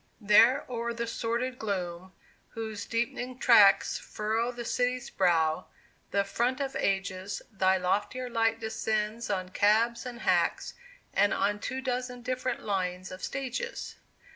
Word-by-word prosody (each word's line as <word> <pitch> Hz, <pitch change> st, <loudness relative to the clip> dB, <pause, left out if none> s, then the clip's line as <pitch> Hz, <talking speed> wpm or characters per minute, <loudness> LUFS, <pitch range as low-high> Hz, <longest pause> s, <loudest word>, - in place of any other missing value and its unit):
There 230 Hz, +6 st, +5 dB
o'er 235 Hz, -1 st, -3 dB
the 235 Hz, 0 st, -2 dB
sordid 235 Hz, +2 st, -2 dB
gloom, 185 Hz, -3 st, -4 dB, 0.4 s
whose 220 Hz, -2 st, -5 dB
deep'ning 240 Hz, +2 st, -2 dB
tracks 215 Hz, -6 st, +6 dB
Furrow 220 Hz, +3 st, -2 dB
the 240 Hz, -1 st, -7 dB
city's 250 Hz, +1 st, -1 dB
brow, 165 Hz, -4 st, +2 dB, 0.4 s
the 200 Hz, -, +2 dB
front 240 Hz, +6 st, -1 dB
of 275 Hz, -1 st, -3 dB
ages, 195 Hz, 0 st, -2 dB
Thy 190 Hz, -2 st, +3 dB
loftier 205 Hz, +7 st, -1 dB
light 225 Hz, -1 st, +1 dB
descends 220 Hz, 0 st, -2 dB
on 185 Hz, -2 st, -2 dB
cabs 220 Hz, +5 st, +2 dB
and 240 Hz, -1 st, -8 dB
hacks, -, -, +1 dB, 0.4 s
And 205 Hz, +1 st, +3 dB
on 205 Hz, +1 st, 0 dB
two 260 Hz, +4 st, -4 dB
dozen 250 Hz, -1 st, -3 dB
different 255 Hz, 0 st, -2 dB
lines 185 Hz, -2 st, -2 dB
of 185 Hz, -, -9 dB
stages! 275 Hz, -, -4 dB
225 Hz, 135 wpm, -29 LUFS, 195-245 Hz, 0.4 s, tracks